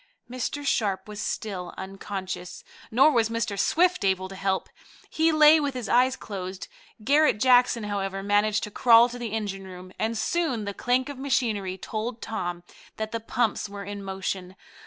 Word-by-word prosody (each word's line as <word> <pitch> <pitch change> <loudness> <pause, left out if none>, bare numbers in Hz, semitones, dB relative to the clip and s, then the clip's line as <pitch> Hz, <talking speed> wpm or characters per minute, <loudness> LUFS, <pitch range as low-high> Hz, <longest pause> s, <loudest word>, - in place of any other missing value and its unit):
Mr. 255 +4 -4
Sharp 205 -7 0
was 210 0 -6
still 190 -5 -4
unconscious, 190 -1 -6 0.3
nor 270 +7 +5
was 230 -5 +2
Mr. 230 -3 -2
Swift 355 - +2
able 190 -1 +1
to 190 - -10
help. 190 0 -1 0.4
He 320 +1 +3
lay 310 0 +7
with 285 -3 -2
his 245 -3 -4
eyes 255 +2 +3
closed. 190 -4 -7 0.4
Garret 290 -1 +4
Jackson, 245 -1 +4
however, 195 -1 -3
managed 205 +1 +2
to 210 - -5
crawl 235 +1 +6
to 245 0 -8
the 235 -3 -4
engine 195 -3 -4
room, 185 0 -10
and 225 +1 -1
soon 250 -2 -1
the 200 - -4
clank 250 +4 0
of 285 -2 -7
machinery 220 -9 -1
told 220 +4 -4
Tom 175 -7 -4 0.3
that 220 0 -4
the 230 - -2
pumps 225 -2 -1
were 200 0 -7
in 200 0 -7
motion. 190 -1 -4
215 Hz, 170 wpm, -26 LUFS, 195-250 Hz, 0.4 s, lay